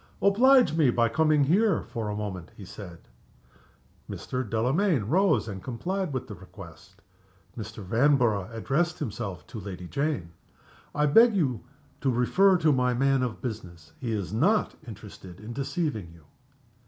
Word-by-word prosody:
"Oblige 250 +5 +5
me 155 -5 +4
by 115 -1 +2
coming 155 +3 +3
here 195 +9 +2
for 110 -2 -5
a 105 - -3
moment," 95 -5 -5
he 100 - -9
said. 90 -3 -11 1.0
Mr. 130 0 -4
Delamayn 125 - +1
rose 190 - +2
and 95 -3 -6
complied 180 +8 -3
with 130 -2 -4
the 105 - -7
request. 90 -3 -14 0.5
Mr. 110 -1 -7
Vanborough 115 -2 +2
addressed 140 +9 -1
himself 105 - -5
to 110 - -8
Lady 90 -3 -7
Jane. 140 - -2 0.6
"I 150 0 +2
beg 225 +9 +6
to 135 - 0 0.5
refer 130 +11 +3
you - - +4
to 155 -2 +4
my 125 -1 +1
man 135 +1 +2
of 125 -3 -3
business. 90 -9 -7
He 120 -4 -3
is 100 -4 -3
not 190 - +2
interested 95 -4 -11
in 110 +3 -8
deceiving 135 - -3
you." 85 -1 -18
120 Hz, 150 wpm, -27 LUFS, 105-155 Hz, 1.0 s, beg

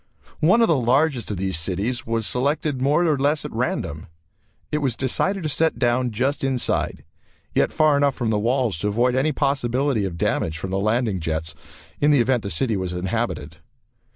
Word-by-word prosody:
One 190 +9 +4
of - - +4
the 165 - +3
largest 130 +1 +1
of 105 - -3
these 95 -2 -1
cities 100 +9 -2
was 115 -1 -1
selected 140 +3 0
more 150 +6 +3
or 150 -4 +1
less 150 +2 +1
at 150 - -5
random. 85 -9 -3 0.6
It 150 - 0
was 135 -5 0
decided 185 +10 -1
to 155 - -1
set 160 +3 +1
down 125 +1 +1
just 130 +7 -1
outside, 130 -2 -1 0.5
yet - - +2
far 155 -2 +3
enough 140 -1 +2
from 115 -3 -1
the 105 - +1
walls 120 -4 0
to 105 - -1
avoid 120 +4 +1
any 135 +4 +1
possibility 135 -3 0
of 85 -3 -5
damage 80 0 -1
from 95 +3 -5
the 95 - 0
landing 110 -1 0
jets 80 0 -3 0.5
in 145 - +3
the 145 -2 +5
event 125 0 +2
the 100 - -5
city 110 +6 +1
was 95 -2 -3
inhabited. 90 -4 -3
125 Hz, 190 wpm, -22 LUFS, 100-140 Hz, 0.6 s, the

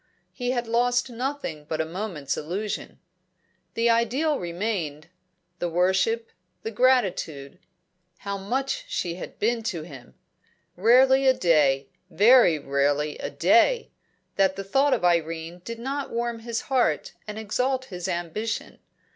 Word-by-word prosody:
He 245 -2 -3
had 245 -1 0
lost 245 +2 +1
nothing 240 - -4
but 155 +1 -3
a 160 - +1
moment's 165 -5 -4
illusion. 195 +7 -4 0.8
The 230 +1 +3
ideal 255 +7 +1
remained; 170 -4 -3 0.5
the 175 - -1
worship, 190 +7 +1 0.3
the 225 - -3
gratitude. 200 - +1 0.6
How 200 +1 -4
much 265 - -2
she 180 - -2
had - - -8
been 230 +2 0
to 185 -8 -3
him! 135 - -12 0.6
Rarely 260 +7 +5
a 260 - +5
day 140 - +3 0.2
very 215 -4 +6
rarely 145 +1 0
a - - -4
day - - +3 0.5
that 190 -1 +3
the 195 - -5
thought 270 +8 +3
of - - -2
Irene 165 0 0
did 230 +3 -6
not 270 +4 -4
warm 235 0 -2
his 230 0 -3
heart 245 - 0
and 210 0 -6
exalt 255 +5 -1
his 180 -6 -6
ambition. 180 +5 -3
210 Hz, 135 wpm, -25 LUFS, 165-245 Hz, 0.8 s, very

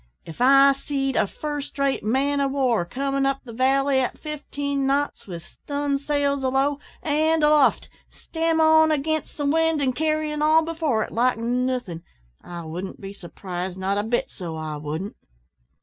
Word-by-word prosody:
If 165 +7 -9
I 275 +2 +7
seed 270 -1 -3
a - - +2
first 295 +4 -6
rate 275 -1 0
man 275 +6 +1
o' 275 - +2
war 255 -9 +1
comin' 275 +6 -1
up 275 0 -1
the 235 - -10
valley 270 +2 +2
at 255 - -2
fifteen 285 -2 -3
knots, 280 -2 -1
with 170 -3 -7
stun' 285 -1 -3
sails 280 -1 0
alow 270 +2 +1 0.2
and 315 +1 +2
aloft, 300 -2 +4 0.2
stem 325 0 -2
on, 315 0 +5
against 310 +1 -2
the 290 - -2
wind, 325 +1 +2
an' 265 -3 +1
carryin' 310 0 -1
all 315 +1 +4
before 315 -9 0
it, - - -8
like 245 +2 +1
nothin', 245 -6 -2 0.4
I 170 -1 -8
wouldn't 180 +4 -6
be 195 0 -8
surprised, 180 -1 -6
not 195 +2 -1
a - - -1
bit, 240 +2 -1
so 170 -4 -7
I 155 -1 -5
wouldn't!" 155 +7 -5
275 Hz, 165 wpm, -23 LUFS, 225-295 Hz, 0.4 s, I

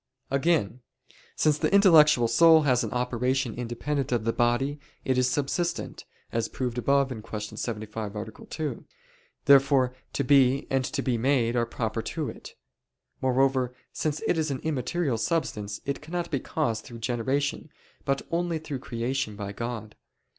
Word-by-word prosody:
Again, 135 - +1 0.5
since 150 -1 +2
the - - +1
intellectual 155 - +6
soul 160 +6 +6
has 125 -4 +3
an - - -2
operation 125 0 0
independent 125 +4 -3
of 120 -3 +1
the 115 +1 0
body, 120 +5 +1 0.3
it 130 - +2
is 125 0 +2
subsistent, 170 +6 -2 0.3
as 115 -1 -1
proved 125 -2 -3
above 140 +2 +2
(Q. 110 -3 -6 0.2
75, 110 -2 -4
A. 105 +1 -3 0.2
2): 155 -2 -4 0.6
therefore 135 -2 +5 0.2
to 140 - 0
be 135 0 +4
and 135 -1 +2
to 140 0 -2
be 120 -3 0
made 125 -2 +2
are 120 -1 +1
proper 115 -1 -2
to - - -3
it. - - -11 0.7
Moreover, 130 -1 +2 0.2
since 155 -1 -2
it 165 - +1
is 155 -1 0
an 135 - -1
immaterial 145 -3 -1
substance 105 -10 -2
it 140 0 -3
cannot 170 +3 -4
be 140 - +1
caused 110 -3 -2
through 120 - -10
generation, 130 +6 -1 0.3
but 135 -1 0
only 170 0 0
through 150 -4 -5
creation 120 -2 -3
by 100 -1 -5
God. 115 0 -5
130 Hz, 155 wpm, -27 LUFS, 115-145 Hz, 0.7 s, intellectual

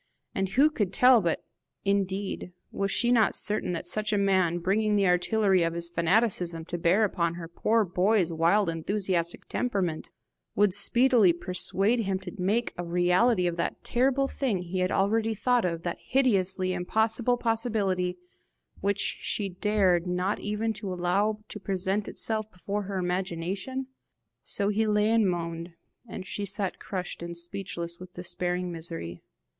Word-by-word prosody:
And 195 -1 -1
who 280 +9 +4
could 205 -10 -1
tell 250 +2 +6
but 170 -3 -1 0.4
indeed 195 -2 -1 0.2
was 195 0 -1
she 240 - +3
not 230 -3 +3
certain 210 -3 -2
that 170 - -4
such 215 +4 0
a 210 - +2
man, 190 -4 +2
bringing 210 +4 +1
the 200 -1 +3
artillery 190 +2 +3
of 165 0 0
his 170 0 -1
fanaticism 175 -1 +1
to 175 +1 -4
bear 180 +6 +3
upon 170 -5 0
her 170 -1 -7
poor 215 +6 +1
boy's 180 0 +1
wild 170 +5 +3
enthusiastic 170 +1 -2
temperament, 190 -10 -2 0.5
would 205 -3 +3
speedily 235 -1 +4
persuade 195 +6 0
him 195 -4 0
to 190 -1 -8
make 210 +6 0
a - - -1
reality 180 +4 +2
of 175 -1 -1
that 170 - -3
terrible 270 +2 +1
thing 230 -11 -2
he 180 +2 -4
had 185 +1 +1
already 220 +3 +1
thought 245 0 +2
of, 170 -1 -2
that - - -3
hideously 190 -8 +1
impossible 220 +6 +1
possibility 210 -6 0 0.6
which 200 +1 0
she 200 -2 -2
dared 185 -2 +1
not 180 +3 -1
even 215 +2 -2
allow 200 +3 0
to 210 - -8
present 195 +1 -1
itself 220 -1 -2
before 200 +2 -4
her 195 0 -4
imagination? 185 +7 -3 0.6
So 200 0 -1
he 215 +1 +1
lay 210 +1 +2
and 225 -4 +3
moaned, 170 0 -4 0.3
and 185 - -7
she 200 +1 -4
sat 195 -1 -2
crushed 185 -3 -5
and 170 0 -6
speechless 170 -1 -5
with 180 0 -12
despairing 180 0 -2
misery. 160 - -5
190 Hz, 155 wpm, -27 LUFS, 175-215 Hz, 0.6 s, tell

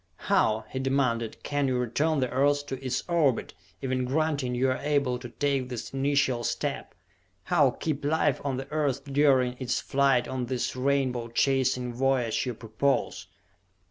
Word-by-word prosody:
"How," 110 0 +1
he 130 - -3
demanded, 130 -4 0
"can 145 -1 0
you 130 -1 0
return 140 +5 0
the 130 - 0
Earth 145 +2 +2
to 135 -2 -6
its 130 -1 -1
orbit, 160 -8 +1 0.3
even 130 -1 0
granting 140 -2 0
you 130 +1 +2
are 130 - -2
able 140 -4 0
to 125 -1 -8
take 135 -1 -1
this 125 0 -6
initial 135 -3 +1
step? - - -3 0.5
How - - +3
keep 150 -3 -3
life 150 -1 +1
on 135 -3 -1
the 135 +1 -5
Earth 140 -3 0
during 135 -3 +3
its 125 -2 -1
flight 135 -3 +2
on 130 -2 -3
this 125 0 -2
rainbow 130 -2 0
chasing 125 0 +1
voyage 130 -2 0
you 125 - -3
propose?" 115 +6 -1
130 Hz, 160 wpm, -27 LUFS, 125-140 Hz, 0.5 s, How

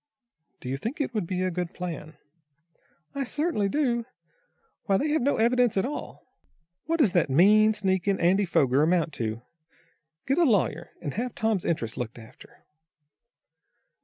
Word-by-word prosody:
"Do - - -8
you 135 +2 -2
think 230 - -5
it 280 -4 -2
would 210 -6 -2
be 185 +1 -2
a 185 - 0
good 180 +1 -4
plan?" 165 -3 -6 1.0
"I 280 - -2
certainly 290 - -1
do. 240 -3 0 0.8
Why 195 -2 +2
they 300 +7 -1
have 310 0 +1
no 280 +4 +1
evidence 240 -1 +2
at 190 - +2
all! 290 +3 -6 0.6
What 330 +1 +1
does 245 - +3
that 175 -5 +2
mean, 210 +9 +5
sneaking 190 -1 0
Andy 190 +4 +3
Foger 140 -5 +2
amount 165 -1 +1
to? 110 +1 -3 0.8
Get 275 +5 +1
a - - +5
lawyer, 185 - +1
and 145 -4 -3
have 240 +3 -3
Tom's 220 -5 0
interests 120 -9 -2
looked 120 -1 -5
after." 115 -1 -16
195 Hz, 160 wpm, -26 LUFS, 165-240 Hz, 1.0 s, mean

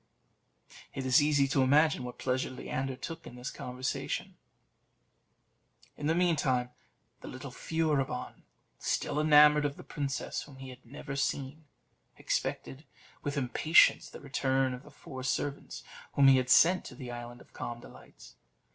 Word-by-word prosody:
It 135 - -4
is 130 +3 +5
easy 145 -2 +3
to 135 0 +2
imagine 145 +1 +3
what 125 0 -7
pleasure 130 0 -1
Leander 130 +1 -4
took 165 +5 -8
in 125 - -10
this 125 +1 -6
conversation. 125 +1 -4 1.6
In 150 - -4
the 160 - +2
meantime, 140 -8 +1 0.5
the - - -10
little - - -8
Furibon, 150 -5 -2 0.4
still 145 - -1
enamoured 150 -1 +6
of 145 -1 -2
the - - -10
princess 140 -2 -3
whom 145 - -12
he 135 0 -9
had 125 0 -12
never 135 +2 -8
seen, 140 +2 -2 0.5
expected 135 +3 -3 0.4
with 145 0 -3
impatience 140 +5 +4
the - - -11
return 135 -2 0
of 125 - -7
the 145 - -15
four 130 -2 -10
servants 140 +2 -3 0.3
whom 140 -1 +6
he 135 - +7
had 130 0 -1
sent 180 +2 +6
to - - -9
the 125 -3 -7
Island 120 0 -8
of - - -19
Calm 120 0 -6
Delights. - - -15
135 Hz, 150 wpm, -30 LUFS, 130-150 Hz, 1.6 s, he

